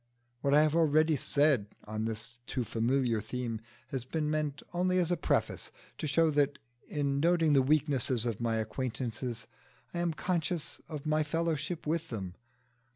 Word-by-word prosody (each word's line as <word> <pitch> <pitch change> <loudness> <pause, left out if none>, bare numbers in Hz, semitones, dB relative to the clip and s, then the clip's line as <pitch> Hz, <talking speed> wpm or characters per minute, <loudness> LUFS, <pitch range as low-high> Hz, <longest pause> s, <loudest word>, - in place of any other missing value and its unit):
What 140 +3 +3
I 150 - +7
have 155 0 +2
already 155 -1 +4
said 140 -6 +2 0.2
on 110 +1 -3
this 115 +1 -5
too 130 - -1
familiar 120 0 +1
theme 115 0 -4 0.3
has 130 -3 -3
been 150 +3 -1
meant 150 -2 -1
only 185 +1 +2
as 180 -1 +2
a - - +4
preface, - - 0 0.3
to 155 - -2
show 160 +2 +3
that 145 -1 +2 0.3
in 140 -2 0
noting 165 -1 +4
the 135 - +6
weaknesses 135 -4 +2
of 115 -2 -2
my 115 -1 +1
acquaintances 120 +1 -3 0.5
I 170 - -2
am 170 -1 +1
conscious 170 -1 -2
of 155 -2 -6
my 155 0 +2
fellowship 165 +1 -1
with 165 +1 -1
them. 95 -6 -4
145 Hz, 160 wpm, -31 LUFS, 120-155 Hz, 0.5 s, I